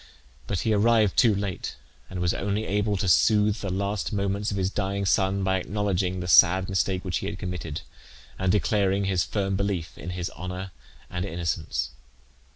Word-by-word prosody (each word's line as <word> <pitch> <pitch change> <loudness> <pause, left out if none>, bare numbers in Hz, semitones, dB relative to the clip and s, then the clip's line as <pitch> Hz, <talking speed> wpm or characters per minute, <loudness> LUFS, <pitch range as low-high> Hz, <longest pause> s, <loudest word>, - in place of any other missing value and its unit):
But 95 - -1
he 110 - +1
arrived 110 -1 +3
too 110 -4 +5
late, 100 -2 -4 0.3
and 95 - -5
was 90 0 +1
only 100 +2 -2
able 105 +1 0
to 95 - -1
soothe 105 +4 +4
the 100 - -4
last 100 +2 -2
moments 100 0 -1
of 100 - -2
his 95 0 0
dying 100 -1 -2
son 95 +1 +2
by 95 0 +1
acknowledging 95 -2 -1
the 90 - -4
sad 90 +3 +6
mistake 95 0 0
which 90 -2 -1
he 95 - -4
had 100 -2 -4
committed, 90 -5 -5 0.6
and 95 -1 +2
declaring 100 -1 +2
his 95 -3 +1
firm 95 +2 -1
belief 95 -4 -2
in 90 - -6
his 90 -1 -3
honour 90 +2 -6 0.4
and 90 0 -2
innocence. 80 -8 -2
95 Hz, 175 wpm, -26 LUFS, 90-100 Hz, 0.6 s, sad